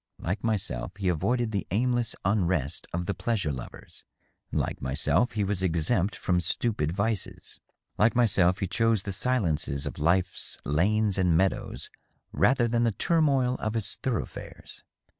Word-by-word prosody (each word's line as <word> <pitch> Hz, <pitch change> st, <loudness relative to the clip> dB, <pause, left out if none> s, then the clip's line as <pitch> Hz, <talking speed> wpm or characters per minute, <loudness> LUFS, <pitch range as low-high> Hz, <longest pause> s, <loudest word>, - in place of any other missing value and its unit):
Like 95 Hz, +4 st, -3 dB
myself, 95 Hz, -, -2 dB
he 95 Hz, -2 st, 0 dB
avoided 120 Hz, +7 st, 0 dB
the 100 Hz, -3 st, -2 dB
aimless 120 Hz, +3 st, 0 dB
unrest 90 Hz, -8 st, 0 dB
of 90 Hz, +1 st, -2 dB
the 100 Hz, -, -1 dB
pleas 115 Hz, -2 st, -1 dB
ure 75 Hz, -, 0 dB
lovers. 65 Hz, -2 st, -10 dB, 0.5 s
Like -, -, -2 dB
myself, 75 Hz, -, +1 dB
he 105 Hz, -1 st, 0 dB
was 100 Hz, -1 st, 0 dB
exempt 90 Hz, +3 st, +1 dB
from 90 Hz, -1 st, 0 dB
stupid 85 Hz, -2 st, 0 dB
vices. 100 Hz, +2 st, -3 dB, 0.4 s
Like 110 Hz, +3 st, +4 dB
myself, 95 Hz, -6 st, +4 dB
he 95 Hz, -, 0 dB
chose 115 Hz, +2 st, +1 dB
the 100 Hz, -, -3 dB
silences 90 Hz, -, 0 dB
of 70 Hz, -, -5 dB
life's 90 Hz, +4 st, 0 dB
lanes 100 Hz, +7 st, +2 dB
and 90 Hz, -3 st, +3 dB
meadows 95 Hz, +2 st, -1 dB, 0.4 s
rather 125 Hz, -2 st, +3 dB
than 115 Hz, 0 st, +1 dB
the 115 Hz, -, +3 dB
turmoil 135 Hz, -, +2 dB
of 110 Hz, +1 st, -2 dB
its 110 Hz, -3 st, -1 dB
thoroughfares. 125 Hz, -4 st, -5 dB
100 Hz, 150 wpm, -27 LUFS, 85-115 Hz, 0.5 s, Like